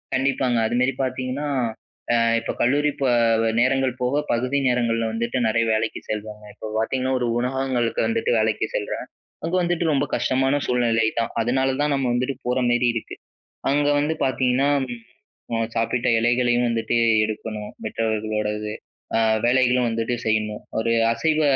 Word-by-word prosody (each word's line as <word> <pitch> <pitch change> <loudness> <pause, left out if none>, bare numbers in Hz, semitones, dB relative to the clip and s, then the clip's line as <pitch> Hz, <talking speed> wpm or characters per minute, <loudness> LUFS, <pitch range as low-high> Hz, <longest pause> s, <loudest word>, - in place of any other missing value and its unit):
கண்டிப்பாங்க. 130 -2 +1
அதுமாரி 125 +3 +1
பார்த்தீங்கன்னா 130 +3 -3 0.7
அ - - +4 0.2
இப்ப - - -4
கல்லூரி 145 +5 +3
ப - - +1 0.6
நேரங்கள் 130 +1 +2
போக 125 +2 0 0.2
பகுதி 130 +4 0
நேரங்கள்ல 115 -2 +1
வந்துட்டு 115 +2 -2
நெறைய 115 +1 +2
வேலைக்கு 110 +1 -1
செல்வாங்க. 105 0 -5
இப்ப 110 +1 -8
பார்த்தீங்கன்னா 130 +4 0
ஒரு 120 - 0
உணகங்களுக்கு 125 -2 -1
வந்துட்டு 230 - 0
வேலைக்கு 110 -1 +1
செல்றேன். 105 - -3 0.4
அங்க 170 +3 -1
வந்துட்டு 175 -1 0
ரொம்ப 145 0 +2
கஷ்டமான 135 +2 +1
சூழ்நிலை 115 -2 +2
தான். 115 - -1
அதனால 130 +3 +1
தான் 150 -1 +1
நம்ம 135 -2 0
வந்துட்டு 125 +3 -1
போற 125 +1 +1
மாரி 120 0 +2
இருக்கு. 115 - -5 0.6
அங்க 145 +1 +2
வந்து 150 +2 0
பார்த்தீங்கன்னா 130 +1 +1 0.8
ம் 115 - -1
அ - - -1 0.2
சாப்பிட்ட 115 +2 0
இலைகளையும் 120 +1 +2
வந்துட்டு 115 0 -1 0.3
எடுக்கணும், 110 -1 -5
மற்றவர்களுடையது. 105 -1 -2 0.5
அ - - +3 0.3
வேலைகளும் 125 0 +3
வந்துட்டு 115 +2 -1
செய்யணும். 110 -1 -1 0.2
ஒரு 115 +1 0 0.2
அசைவ 155 +7 +1
125 Hz, 140 wpm, -23 LUFS, 115-130 Hz, 0.8 s, அ